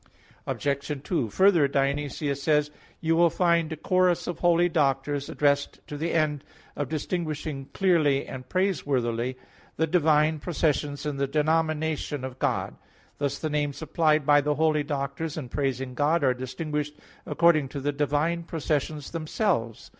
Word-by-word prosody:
Obj. 140 0 -2
2: 145 - -1
Further, 185 - +4
Dionysius 140 +1 -1
says 150 0 +2
(Div. - - -26
Nom. - - -25
i): - - -27
"You 165 0 +2
will 170 0 +5
find 170 -1 +2
a 160 - -4
chorus 185 +2 +2
of 175 -2 -4
holy 175 0 +4
doctors 145 -3 0
addressed 145 -1 +1
to 150 - -7
the 160 +3 -2
end 150 -3 0 0.3
of 145 - -3
distinguishing 155 -3 -3
clearly 160 -8 +2
and 130 -1 -9
praiseworthily 130 -10 0 0.4
the 160 - +1
divine 155 -2 +3
processions 150 -3 -1
in 145 -2 -2
the 140 0 0
denomination 155 -1 0
of 130 -1 -6
God." - - -1 0.4
Thus 140 -1 -1
the 155 - -3
names 145 -1 -1
applied 155 -2 +2
by 145 0 +5
the 150 +1 0
holy 155 0 +2
doctors 145 +2 -3
in 135 -6 -5
praising 135 -1 -2
God 150 +4 +1
are 130 -2 +4
distinguished 150 +4 -4 0.3
according 160 -5 +3
to 140 - -5
the 145 +2 -1
divine 150 +4 0
processions 155 -2 -2
themselves. 155 - -1
150 Hz, 155 wpm, -26 LUFS, 140-160 Hz, 0.4 s, will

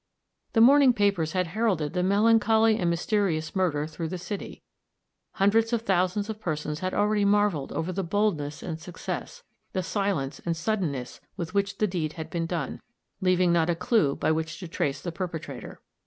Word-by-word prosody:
The 225 - +4
morning 270 +1 +7
papers 195 -7 +1
had 185 -1 +1
heralded 185 -7 0
the 180 - 0
melancholy 220 +3 +4
and 175 - +1
mysterious 170 -2 0
murder 165 -6 +1
through 160 +1 -5
the 185 - -4
city; 200 +3 -6 0.7
hundreds 225 +4 +2
of 230 -1 0
thousands 190 0 +1
of 220 -1 -5
persons 150 -3 -3
had 185 +1 -2
already 210 0 +2
marveled 200 -7 +2
over 165 +3 -2
the 195 +2 -2
boldness 165 -7 -1
and 160 -3 -4
success, 485 - -6 0.3
the 185 - -1
silence 190 -8 -2
and 170 -1 -1
suddenness 160 - -2 0.2
with 170 -2 -5
which 200 0 0
the 215 - +2
deed 170 -6 -2
had 160 -1 -7
been 165 -1 -2
done, 170 -1 -3 0.4
leaving 185 -2 +3
not 165 -1 +2
a 170 - +2
clue 170 - +2
by - - +1
which 160 0 -2
to 180 - -6
trace 140 -3 -2
the 175 - -4
perpetrator. 170 -2 -6
185 Hz, 175 wpm, -27 LUFS, 160-205 Hz, 0.7 s, morning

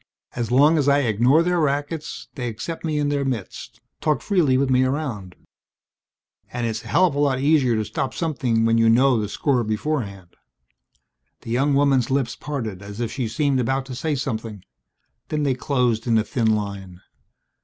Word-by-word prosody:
As 120 -3 -2
long 145 +6 +4
as 145 -1 +2
I 140 +1 +4
ignore 125 +6 +3
their 180 0 +1
rackets 150 +1 -2
they 125 -3 -4
accept 120 +9 -6
me 155 -2 -1
in 145 -1 0
their 145 -1 0
midst, 125 -8 -5 0.2
talk 150 -1 0
freely 165 -11 +2
with 140 +1 +1
me 130 0 +4
around. 130 - -3 1.2
And 120 -1 -3
it's 110 -1 -3
a - - -11
hell 185 - +4
of 175 - 0
a 145 - -2
lot 140 -3 +2
easier 140 -4 +3
to 110 -1 -1
stop 130 - -3
something 130 -9 0
when 115 0 +3
you 115 0 +4
know 125 +1 +4
the 105 - -3
score 125 +1 0
beforehand." 105 - -3 1.1
The 115 - -8
young 135 +4 +2
woman's 135 -3 +2
lips 130 -3 0
parted 115 -10 -5
as 100 +2 -9
if 120 -2 -2
she 125 -4 -2
seemed 140 +3 0
about 135 +2 -1
to 135 - -8
say 150 +4 -1
something. 110 -7 -4 0.7
Then 150 -1 -1
they 140 -2 +2
closed 125 -4 0
in 115 -1 +3
a 110 - +2
thin 110 -2 +1
line. 100 -3 -6
130 Hz, 185 wpm, -22 LUFS, 115-145 Hz, 1.2 s, long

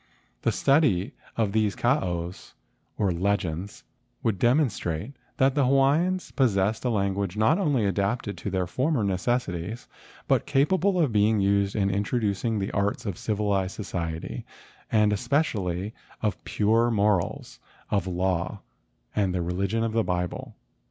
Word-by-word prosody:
The - - +2
study 135 - +2 0.2
of 110 -3 +1
these 105 -1 +1
kaaos 90 - -1 0.4
or 100 -3 +1
legends 95 0 -2 0.4
would 105 -5 0
demonstrate 120 - +1 0.2
that 135 0 +4
the 145 - +2
Hawaiians 150 +8 +2
possessed 110 -5 +1
a - - +2
language 100 -2 -1
not 130 - +3
only 145 - +2
adapted 100 +1 -1
to 100 - -3
their 95 -1 0
former 130 - 0
necessities 100 0 -2 0.4
but - - +2
capable 180 +7 +2
of 150 -7 +2
being 105 0 +3
used 100 0 +2
in 100 -1 +1
introducing 105 +2 0
the 100 -1 -2
arts 100 +2 -1
of 100 -4 -2
civilized 100 -3 -1
society 85 -5 -4 0.5
and 105 -2 +4
especially 105 - -1 0.3
of 105 -2 -1
pure 115 +3 +2
morals, 105 -5 0 0.3
of 100 -3 +1
law, 95 +1 -1 0.5
and 95 -3 +1
the 90 - 0
religion 100 +6 -1
of 115 -1 -1
the 115 - +3
Bible." 90 -2 -3
105 Hz, 135 wpm, -26 LUFS, 95-120 Hz, 0.5 s, that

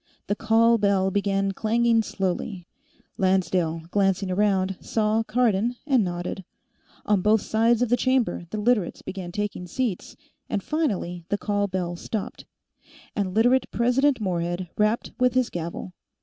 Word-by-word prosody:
The 205 - -1
call 225 +2 +3
bell 195 -2 +2
began 195 0 0
clanging 230 +3 +2
slowly. 190 -2 -3 0.5
Lancedale, 180 -4 +1
glancing 195 -1 +1
around, 195 -1 +1
saw 215 0 +1
Cardon 230 0 +1
and 265 -6 +3
nodded. 175 +1 -4 0.6
On 205 -3 +2
both 210 +2 +3
sides 230 +2 +2
of 245 - -1
the 245 - +4
chamber, 255 -8 0
the 215 - -4
Literates 210 -4 +1
began 185 -2 -6
taking 205 -2 -4
seats, 225 0 -3 0.3
and 200 - -2
finally 195 - -2
the 205 - +1
call 205 -1 0
bell 180 -2 -3
stopped, 205 +4 -5 0.7
and 195 -2 -2
Literate 245 +3 +3
President 250 +3 +2
Morehead 175 -2 -2
rapped 215 +2 +1
with 250 0 +2
his 255 -2 +2
gavel. 170 +2 -5
205 Hz, 140 wpm, -25 LUFS, 185-230 Hz, 0.7 s, the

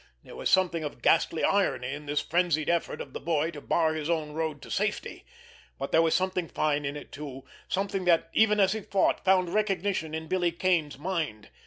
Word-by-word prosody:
There - - -12
was - - -2
something 175 -3 +3
of 145 -5 -7
ghastly 165 -1 +3
irony 135 -10 +1
in 150 +1 -8
this 145 0 0
frenzied 170 -3 +1
effort 170 -1 -1
of 135 - -9
the - - -4
boy 160 0 0
to 150 -3 -9
bar 160 +1 +1
his 155 0 -3
own 155 -3 -1
road 155 -1 -3
to - - -10
safety; - - -2 0.5
but 135 - -4
there 165 - +5
was 165 -1 +2
something 185 -2 0
fine 150 -2 0
in 140 +1 -3
it 145 - -11
too, 140 -3 -8 0.2
something 195 -1 -1
that, 165 -1 +3
even 210 -1 +4
as 190 -1 +4
he 220 - -4
fought, 195 -1 +1
found 185 -2 +3
recognition 195 -6 0
in 160 0 -5
Billy 175 0 +1
Kane's 170 -5 0
mind. 150 - -3
165 Hz, 205 wpm, -28 LUFS, 150-185 Hz, 0.5 s, there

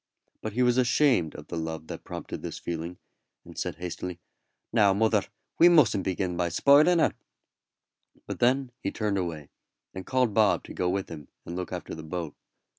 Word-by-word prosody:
But 110 - -4
he 125 +3 +2
was 125 0 +3
ashamed 125 - +3
of 75 - -9
the 85 - -6
love 80 -1 -4
that - - -8
prompted - - -7
this - - -6
feeling, 85 +1 -5 0.5
and - - -12
said - - -3
hastily: 90 0 -6 0.5
"Now, 100 -4 +4
mother, 110 -1 +2 0.3
we 175 - +8
mustn't 125 - +4
begin 95 -1 -1
by 85 0 0
spoiling 145 - +5
her;" 160 - +3 1.1
but - - -6
then 130 +1 +2
he - - -1
turned 105 -3 -1
away, 80 -5 -4 0.4
and 95 - -6
called 125 0 +1
Bob 110 -1 +3
to - - -10
go 90 - 0
with 95 +1 -2
him 75 -4 -9 0.2
and 85 - -6
look 90 0 -4
after 90 -1 -5
the 80 - -7
boat. 80 -1 -5
95 Hz, 185 wpm, -27 LUFS, 85-120 Hz, 1.1 s, we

